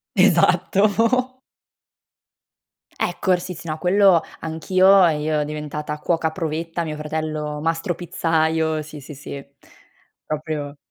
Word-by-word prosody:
Esatto. 210 +7 +3 1.5
Ecco, 190 - -1
r 180 - +1
sì, 180 +1 -6
sì, 165 0 -10
no 155 - -3
quello 185 0 +4 0.2
anch'io 185 +4 +4
e 155 -2 0
io 150 0 0
diventata 150 0 -5
cuoca 160 0 0
provetta, 165 +1 -3
mio 155 -2 -4
fratello 150 -1 -4
mastro 165 +3 -1
pizzaiolo, 160 -2 0
sì, 150 0 -10
sì, 150 - -10
sì, 140 0 -8 0.8
proprio 150 -2 -4
160 Hz, 115 wpm, -22 LUFS, 150-180 Hz, 1.5 s, quello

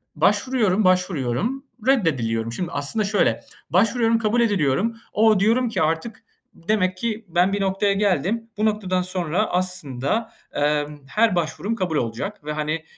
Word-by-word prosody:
Başvuruyorum, 220 -6 +2
başvuruyorum, 185 - 0 0.2
reddediliyorum. 120 - +1
Şimdi, 170 +8 -4
aslında 145 +10 0
şöyle; 200 0 +2 0.3
başvuruyorum, 225 +4 +3
kabul 225 +2 +1
ediliyorum. 205 - +1 0.2
"O!", 215 -2 +4
diyorum 230 +5 +2
ki 210 -7 -2
artık 160 +8 -1 0.3
"Demek 185 0 0
ki 225 +2 -3
ben 175 +3 +2
bir 200 - -1
noktaya 195 +1 +1
geldim, 205 +3 0
bu 215 - +1
noktadan 200 -4 0
sonra 180 +2 -1
aslında, 180 - -1 0.2
emm, 145 0 0
her 215 +4 +2
başvurum 175 +6 -2
kabul 185 -7 -2
olacak." 125 - -3
ve, 150 - -3
hani, 155 +1 -2
185 Hz, 140 wpm, -22 LUFS, 155-220 Hz, 0.3 s, O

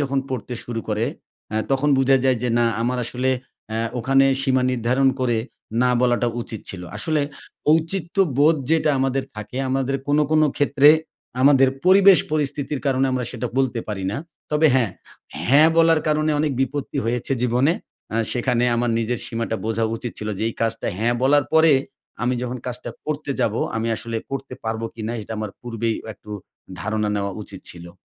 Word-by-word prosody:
যখন 140 -1 0
পড়তে 125 -1 -4
শুরু 120 -1 -4
করে, 110 +1 0 0.5
অ্যা 110 - -1
তখন 135 +2 +2
বুঝা 135 0 +4
যায় 130 -2 +3
যে, 125 - 0
"না, 120 - +3 0.2
আমার 125 +1 0
আসলে 125 +2 -1 0.4
অ্যা 110 - -1 0.2
ওখানে 135 +3 +4 0.2
সীমা 130 -1 +2
নির্ধারণ 125 +2 +2
করে 120 -2 +1 0.4
'না' 125 0 +3
বলাটা 120 -1 +2
উচিত 110 -2 -6
ছিলো।" 90 -2 -7
আসলে 155 -2 0 0.5
ঔচিত্যবোধ 165 -3 +2
যেটা 160 -2 +3
আমাদের 135 0 0
থাকে, 105 +4 -7
আমাদের 135 0 0
কোনো, 145 +1 +3
কোনো 155 -1 +4
ক্ষেত্রে 145 0 +4 0.5
আমাদের 135 -1 +6 0.2
পরিবেশ 190 -2 +7
পরিস্থিতির 145 -1 -1
কারণে 135 0 +2
আমরা 125 -1 -1
সেটা 125 0 -3
বলতে 130 -3 +1
পারি 95 -3 -3
না। 105 - -3 0.3
তবে 150 +1 +4
হ্যাঁ, 120 -7 +2 0.6
'হ্যাঁ' 150 +4 +7
বলার 165 -1 +5
কারণে 155 0 +2
অনেক 150 -2 +1
বিপত্তি 135 +1 -2
হয়েছে 120 +3 -1
জীবনে। 125 +6 +3 0.4
আ - - +1 0.2
সেখানে 120 0 +1
আমার 120 0 +1
নিজের 120 +2 -1
সীমাটা 115 -1 -2
বোঝা 115 0 0
উচিত 120 0 -6
ছিলো 105 0 -3
যে, - - -3
"এই - - -6
কাজটা 115 0 -1
'হ্যাঁ' 120 +2 +1
বলার 145 +2 +4
পরে 160 0 +6 0.5
আমি 125 +1 +1
যখন 125 0 -3
কাজটা 120 -1 -4 0.2
করতে 150 -1 -3
যাবো, 110 +1 +1 0.2
আমি 115 +1 -1
আসলে 115 -1 -4
করতে 135 -1 -5
পারবো 110 0 -2
কিনা?" 115 0 -4
এটা 110 - -7
আমার 110 -1 -3
পূর্বেই 115 -2 -2
অ - - -10
একটু 105 - -15 0.5
ধারণা 110 +2 -1
নেওয়া 100 -1 -2
উচিত 100 -2 -9
ছিলো। 85 0 -10
125 Hz, 175 wpm, -22 LUFS, 115-145 Hz, 0.6 s, পরিবেশ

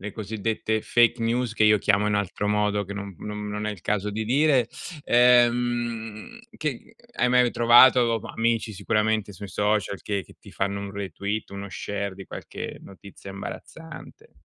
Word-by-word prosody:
le 100 +1 -6
cosiddette 110 +1 -2
fake 120 0 +3
news 120 +1 0
che 110 - +3
io 105 -1 +5
chiamo 105 +1 +2
in 105 - +1
altro 105 0 -1
modo 105 0 +1
che 100 - -7
non 100 -1 -6
non 105 0 -6
non 105 +1 -4
è - - -1
il 105 -4 -8
caso 105 +1 -1
di 110 +2 -3
dire, 130 -1 +3 0.4
ehm, 120 - +2 0.2
che 150 -6 -5 0.2
hai 125 - +1
mai 125 -1 +4
trovato, 120 -1 +6
amici 115 -1 -1
sicuramente 105 +1 0
sui 100 +1 -9
social 105 0 -1
che 100 -2 -2
che - - -18
ti - - -15
fanno 100 +1 -2
un 100 0 -6
retweet, 100 +2 -4
uno 100 0 -7
share 100 -1 -4
di 95 0 -10
qualche - - -7
notizia 100 0 -12
imbarazzante? 160 +11 -10
105 Hz, 165 wpm, -25 LUFS, 100-120 Hz, 0.4 s, trovato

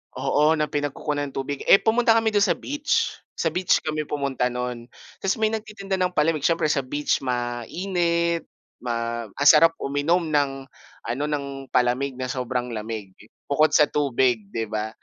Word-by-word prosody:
Oo, 150 +4 +2
na 150 -1 -1
pinagkukunan 145 0 -2
ng - - -18
tubig, 135 +1 -3
eh, - - +9
pumunta 230 0 +3
kami 225 -1 +2
dun 205 - +3
sa - - +2
beach. 300 +12 -1 0.2
Sa 165 - 0
beach 180 0 +3
kami 155 0 -2
pumunta 140 -4 -1
no'n 125 -1 -5 0.3
tapos 195 +2 0
may 220 0 +1
nagtitinda 210 -3 -5
ng 185 -1 +1
palamig 155 -1 +2
siyempre 165 +1 +1
sa 145 -2 +2
beach 145 +3 -1
mainit, 170 - -1 0.3
ma 115 -1 -3
ang 140 +8 -3
sarap 165 +1 +7
uminom 155 +5 +1
ng 135 -2 0 0.4
ano, 135 +5 -2
ng 145 -2 -2 0.3
palamig 125 +2 +1
na 130 - -3
sobrang 125 -1 -2
lamig 110 -2 -5 0.4
bukod 155 +2 +3
sa 150 - +6
tubig, 130 -5 +1
'di 115 -1 -1
ba? 110 0 -2
145 Hz, 165 wpm, -24 LUFS, 125-170 Hz, 0.4 s, eh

